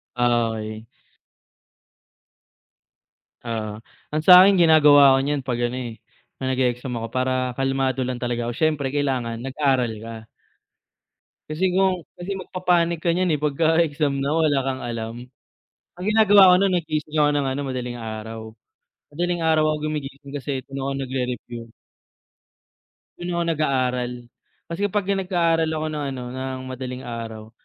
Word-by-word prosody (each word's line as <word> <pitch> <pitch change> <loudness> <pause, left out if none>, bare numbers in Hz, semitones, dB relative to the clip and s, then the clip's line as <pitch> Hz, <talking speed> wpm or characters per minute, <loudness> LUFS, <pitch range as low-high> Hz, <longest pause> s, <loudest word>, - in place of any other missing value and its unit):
Ah, 120 -1 +2
okey. 110 0 -6 2.6
Oo, 110 -2 -4 0.3
ang 155 - 0
sa'kin 185 +1 +8
ginagawa 145 -4 +7
'ko - - +2
niyan 145 0 -1
'pag 125 -2 -3
ano, 120 +1 -2
eh, 120 -3 -6 0.4
'pag 130 - -4
nag-e-exam 125 0 -1
ako 115 - -5
para 130 0 -1
kalmado 135 -1 0
lang 125 -1 -4
talaga 120 -1 -2
'ko, 120 - -3
siyempre 145 0 0
kailangan 130 -5 -1
nag-aral 130 -2 0
ka. 115 0 -7 1.3
Kasi 155 +4 -2
kung 190 -1 +3 0.2
kasi 175 +3 -6
magpa-panic 175 -2 0
ka 170 - +1
niyan, 180 -2 +1
eh, 150 - +1
pagka 160 +3 +2
exam 145 -3 0
na 140 - -1
wala 155 -4 +2
kang 130 -1 -3
alam. 115 -1 -4 0.8
Ang 180 - -6
ginagawa 205 -3 +6
ko - - +7
no'n, 195 -2 +2
nagising 155 -2 -3
ako 150 -1 +4
nang 140 -2 0
ano, 135 +2 -3
madaling 125 -2 -4
araw. 110 0 -6 0.7
Madaling 175 +2 -1
araw 160 -1 +3
ako 155 - 0
gumigising 140 -1 -6
kasi 140 -2 -4
doon 135 0 -6
ako 135 +1 -2
nagre-review. 125 -2 -4 1.5
Do'n 175 0 -4
ako 170 - 0
nag-aaral. 125 -4 0 0.6
Kasi 200 +5 -1
pagka 200 0 -1
nag-aaral 170 -4 +1
ako 155 0 -2
ng 150 -1 -3
ano, 125 - -6
ng 130 0 -5
madaling 130 0 -6
araw, 115 -2 -7
135 Hz, 145 wpm, -23 LUFS, 125-160 Hz, 2.6 s, sa'kin